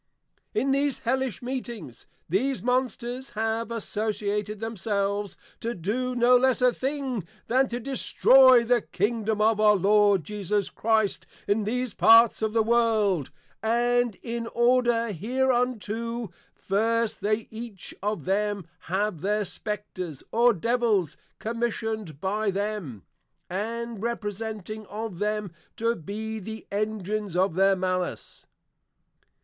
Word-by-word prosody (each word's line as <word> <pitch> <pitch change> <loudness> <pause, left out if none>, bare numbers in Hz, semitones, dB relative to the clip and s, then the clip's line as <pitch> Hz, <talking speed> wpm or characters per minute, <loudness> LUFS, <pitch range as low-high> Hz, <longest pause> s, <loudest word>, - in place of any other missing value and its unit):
In 265 +5 +1
these 280 0 +1
hellish 260 -2 -1
meetings, 240 - -6 0.2
these 255 - 0
Monsters 250 0 -1
have 225 +1 -1
associated 210 -2 -2
themselves 200 -3 -2 0.2
to 235 +1 -3
do 245 +8 -2
no 245 +1 +5
less 260 -1 +3
a 250 -1 +4
thing 265 - -2 0.2
than, 260 +3 +3
To 240 0 -4
destroy 260 0 +5
the 240 0 +2
Kingdom 215 +2 -1
of 220 0 +3
our 210 -1 +6
Lord 205 -1 +4
Jesus 205 +3 -2
Christ, 220 -2 +1 0.2
in 205 +1 +1
these 250 0 -1
parts 230 0 +6
of 220 -1 0
the 225 0 +2
World; 220 - +2 0.3
and 240 0 +2
in 230 -1 -4
order 240 -1 +2
hereunto, 235 0 -1 0.2
First 225 +3 0
they 215 +2 0
each 220 -4 -7
of 205 -5 -2
them 200 0 0 0.2
have 190 -1 -1
their 210 +2 0
Spectres, 185 - -5
or 240 +2 +5
Devils, 215 -4 +1 0.2
commission'd 220 -7 -3
by 205 +3 0
them, 195 - -3 0.3
& - - -26
representing 220 -1 -4
of 215 -4 -6
them, 210 -2 -1 0.3
to 230 +1 +1
be 220 +5 -5
the 220 +2 -8
Engines 210 -2 -2
of 190 -1 +2
their 195 +2 +4
Malice. 185 -1 -3
220 Hz, 120 wpm, -26 LUFS, 205-235 Hz, 0.3 s, our